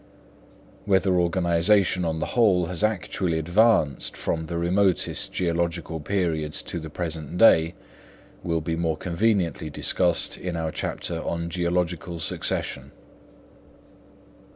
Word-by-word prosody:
Whether 95 Hz, -1 st, +2 dB
organisation 90 Hz, +2 st, +2 dB
on 80 Hz, -1 st, -1 dB
the -, -, -1 dB
whole 100 Hz, -7 st, +4 dB
has 90 Hz, +2 st, -4 dB
actually 95 Hz, -5 st, 0 dB
advanced 85 Hz, -2 st, +2 dB
from 80 Hz, -1 st, -2 dB
the 85 Hz, -, -3 dB
remotest 90 Hz, +1 st, +1 dB
geological 85 Hz, -2 st, -1 dB
periods 80 Hz, -3 st, -1 dB
to 85 Hz, -, -5 dB
the 80 Hz, -1 st, -8 dB
present 80 Hz, -1 st, -5 dB
day 85 Hz, -5 st, +5 dB, 0.7 s
will 85 Hz, -2 st, -1 dB
be 80 Hz, +1 st, -2 dB
more 80 Hz, -1 st, -1 dB
conveniently 90 Hz, -2 st, 0 dB
discussed 85 Hz, +3 st, 0 dB
in 90 Hz, -1 st, -4 dB
our 80 Hz, -1 st, -2 dB
chapter 85 Hz, +1 st, -4 dB
on 85 Hz, 0 st, -3 dB
Geological 90 Hz, -1 st, -1 dB
Succession. 80 Hz, -, -3 dB
85 Hz, 115 wpm, -25 LUFS, 80-90 Hz, 0.7 s, day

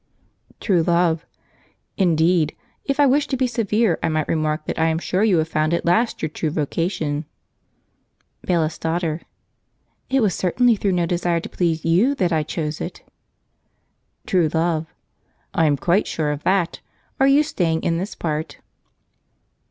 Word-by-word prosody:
True 185 Hz, -6 st, +2 dB
Love. 170 Hz, -1 st, +1 dB, 0.7 s
"Indeed! 165 Hz, -3 st, +2 dB, 0.3 s
If 275 Hz, 0 st, -1 dB
I 290 Hz, -, +6 dB
wished 285 Hz, +2 st, +2 dB
to 265 Hz, -, -1 dB
be 260 Hz, -, +2 dB
severe 225 Hz, -5 st, +1 dB
I -, -, 0 dB
might 155 Hz, -1 st, -1 dB
remark: 155 Hz, -1 st, -1 dB
that -, -, -4 dB
I 160 Hz, -, +3 dB
am 160 Hz, 0 st, +1 dB
sure 185 Hz, +4 st, 0 dB
you 205 Hz, -5 st, +4 dB
have 160 Hz, 0 st, +1 dB
found 155 Hz, +1 st, +1 dB
at -, -, -3 dB
last 220 Hz, +6 st, +1 dB
your 155 Hz, -, 0 dB
true 155 Hz, +1 st, -2 dB
vocation!" 155 Hz, 0 st, -2 dB, 1.2 s
Bailiff's 165 Hz, -3 st, 0 dB
Daughter. 165 Hz, -1 st, -1 dB, 0.9 s
"It 270 Hz, -2 st, +2 dB
was 200 Hz, -4 st, +2 dB
certainly 235 Hz, +6 st, +2 dB
through 200 Hz, -2 st, 0 dB
no 175 Hz, -1 st, +1 dB
desire 175 Hz, 0 st, 0 dB
to -, -, -8 dB
please 165 Hz, -3 st, -1 dB
you 195 Hz, +12 st, +3 dB
that 180 Hz, -8 st, 0 dB
I 160 Hz, -, +2 dB
chose 150 Hz, 0 st, -4 dB
it." -, -, -6 dB, 1.2 s
True 175 Hz, -4 st, +2 dB
Love. 160 Hz, -1 st, 0 dB, 0.7 s
"I 160 Hz, -, +3 dB
am 145 Hz, -1 st, +2 dB
quite 180 Hz, +8 st, +1 dB
sure 150 Hz, -2 st, -1 dB
of 145 Hz, 0 st, -4 dB
that! 185 Hz, -3 st, +1 dB, 0.4 s
Are 270 Hz, -, +5 dB
you 280 Hz, +2 st, +5 dB
staying 165 Hz, -, -1 dB
in 165 Hz, 0 st, 0 dB
this 195 Hz, +4 st, -5 dB
part?" 155 Hz, -1 st, -3 dB
170 Hz, 160 wpm, -21 LUFS, 160-195 Hz, 1.2 s, I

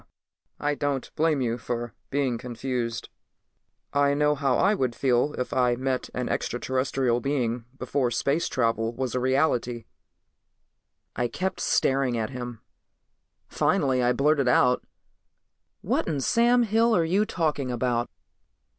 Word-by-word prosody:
"I 145 Hz, 0 st, 0 dB
don't 145 Hz, -2 st, -2 dB
blame 155 Hz, -3 st, +1 dB
you 120 Hz, -1 st, -1 dB
for 120 Hz, -1 st, -4 dB, 0.2 s
being 130 Hz, -4 st, 0 dB
confused. 120 Hz, -1 st, -4 dB, 0.8 s
I 140 Hz, 0 st, +3 dB
know 150 Hz, 0 st, +3 dB
how 135 Hz, -3 st, +1 dB
I 200 Hz, -, +3 dB
would 130 Hz, -, -1 dB
feel 130 Hz, +3 st, +1 dB
if 125 Hz, -, -3 dB
I 125 Hz, -2 st, +2 dB
met 130 Hz, +1 st, -2 dB
an 125 Hz, -1 st, -2 dB
extraterrestrial 130 Hz, 0 st, 0 dB
being 120 Hz, -4 st, -1 dB
before 135 Hz, -3 st, 0 dB
space 140 Hz, +7 st, 0 dB
travel 115 Hz, -1 st, 0 dB
was 130 Hz, -2 st, -3 dB
a 125 Hz, -, 0 dB
reality." 125 Hz, -3 st, 0 dB, 1.3 s
I 120 Hz, 0 st, 0 dB
kept 185 Hz, +11 st, -3 dB
staring 135 Hz, -3 st, +1 dB
at 110 Hz, +3 st, -2 dB
him. 125 Hz, -3 st, -6 dB, 0.9 s
Finally 130 Hz, -2 st, +1 dB
I 120 Hz, 0 st, +3 dB
blurted 140 Hz, 0 st, +2 dB
out, 125 Hz, 0 st, +3 dB, 1.0 s
"What -, -, 0 dB
in 150 Hz, -4 st, -1 dB
Sam 240 Hz, -, +3 dB
Hill 225 Hz, +1 st, +3 dB
are 170 Hz, -, +3 dB
you 190 Hz, +6 st, +2 dB
talking 155 Hz, -9 st, -1 dB
about?" 120 Hz, -1 st, -1 dB
130 Hz, 135 wpm, -26 LUFS, 120-145 Hz, 1.3 s, I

